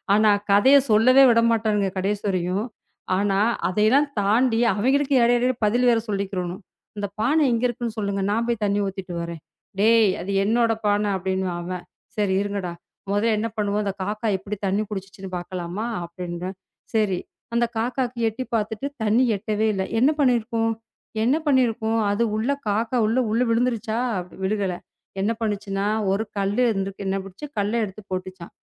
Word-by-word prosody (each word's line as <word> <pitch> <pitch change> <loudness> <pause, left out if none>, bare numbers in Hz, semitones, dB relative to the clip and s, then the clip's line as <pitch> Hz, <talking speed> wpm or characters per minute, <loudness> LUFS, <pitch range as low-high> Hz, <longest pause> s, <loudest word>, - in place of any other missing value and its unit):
ஆனா 215 0 +5 0.2
கதையை 260 +8 +7
சொல்லவே 255 +6 +6
விடமாட்டானுங்க 220 -4 +2
கடைசி 200 +2 -1
வரையும். 185 +2 -1 0.5
ஆனா, 195 0 +1 0.3
அதையெல்லாம் 220 +10 +3
தாண்டி 225 +3 +2
அவங்களுக்கு 270 +7 +2
இடையிடையில 245 +2 +3
பதில் 240 +4 +2
வேற 230 - +3
சொல்லிக்கிறணும். 190 -2 -3 0.4
"இந்தப் 205 -1 -4
பானை 295 +7 +3
எங்க 230 0 0
இருக்குன்னு 240 -1 -4
சொல்லுங்க. 200 -1 -1
நான் 230 +2 0
போய்த் 235 -3 -1
தண்ணி 200 0 +1
ஊத்திட்டு 190 -2 -6
வர்றேன்." 170 -1 -6 0.4
"டேய்! 225 -1 +5
அது 195 - -4
என்னோட 230 +2 +2 0.2
பானை" 205 0 +2
அப்படின்னுவான் 190 -1 -2
அவன். 180 0 -5 0.3
"சரி 205 -2 +1
இருங்கடா, 200 -3 -3 0.4
முதல்ல 215 +2 +2
என்ன 225 - -1
பண்ணுவோம்? 205 0 0
அந்தக் 200 -1 -4
காக்கா 215 +3 -3
எப்படி 205 +2 -6
தண்ணி 195 +2 +1
குடிச்சிச்சுன்னு 195 -1 -7
பாக்கலாமா? 180 +3 -5 0.2
அப்படின்றேன். 175 +2 -6 0.4
"சரி, 210 -4 +2 0.4
அந்தக் 235 0 +1
காக்காக்கு 245 +1 -2
எட்டி 225 +4 -5
பாத்துட்டு 220 +3 -2 0.2
தண்ணி 220 +4 +3
எட்டவே 215 +1 -1
இல்ல. 190 -1 -1 0.2
என்ன 260 +5 +5
பண்ணி 260 -4 +4
இருக்கும்?" 225 0 -1 0.5
"என்ன 250 +5 +3
பண்ணி 265 -3 +5
இருக்கும்? 225 0 -1
அது 205 +3 +1
உள்ள 230 +6 0 0.2
காக்கா 225 +4 0
உள்ள 230 +4 +1
உள்ள 230 +3 +1
விழுந்துருச்சா?" 230 -1 0 0.5
"விழுகல. 195 -2 0 0.5
என்ன 205 +3 +1
பண்ணுச்சுனா, 205 -2 -2 0.3
ஒரு 200 +3 +1
கல்லு 200 +4 0
இருந்துருக்கு. 195 -1 -4
என்ன 190 - 0
பண்ணிச்சு? 195 +9 -9
கல்லை 205 +3 0
எடுத்துப் 200 +1 -12
போட்டுச்சாம். 185 -1 -6
210 Hz, 155 wpm, -23 LUFS, 195-230 Hz, 0.5 s, கதையை